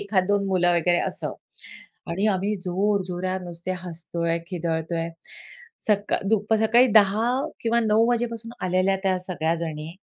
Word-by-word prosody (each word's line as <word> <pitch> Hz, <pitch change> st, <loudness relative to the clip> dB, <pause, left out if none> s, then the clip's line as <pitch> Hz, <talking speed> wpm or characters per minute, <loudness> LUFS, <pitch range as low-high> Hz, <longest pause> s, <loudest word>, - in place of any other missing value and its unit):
एखादं 200 Hz, -2 st, 0 dB
2 205 Hz, 0 st, +1 dB
मुलं 180 Hz, -2 st, +3 dB
वगैरे 175 Hz, +1 st, +2 dB
असं -, -, -4 dB, 0.8 s
आणि 190 Hz, +5 st, 0 dB
आम्ही 195 Hz, +3 st, -1 dB
जोर 195 Hz, +2 st, 0 dB
जोरात 185 Hz, +1 st, -3 dB
नुसते 175 Hz, +1 st, -5 dB
हसतो 170 Hz, -1 st, -6 dB
आहे, 165 Hz, 0 st, +1 dB
खिदळतो 165 Hz, -2 st, -2 dB
आहे. 165 Hz, 0 st, -2 dB, 0.8 s
सकाळ 205 Hz, -2 st, +1 dB
दुप 215 Hz, 0 st, +2 dB
सकाळी 235 Hz, +3 st, +5 dB
10 210 Hz, +1 st, +5 dB, 0.3 s
किंवा 235 Hz, 0 st, +2 dB
9 220 Hz, 0 st, +3 dB
वाजेपासून 230 Hz, -1 st, -2 dB
आलेल्या 185 Hz, +2 st, +2 dB
त्या 190 Hz, -2 st, +1 dB
सगळ्या 170 Hz, -3 st, -1 dB
जणी, 160 Hz, -2 st, -5 dB
185 Hz, 150 wpm, -24 LUFS, 175-210 Hz, 0.8 s, सकाळी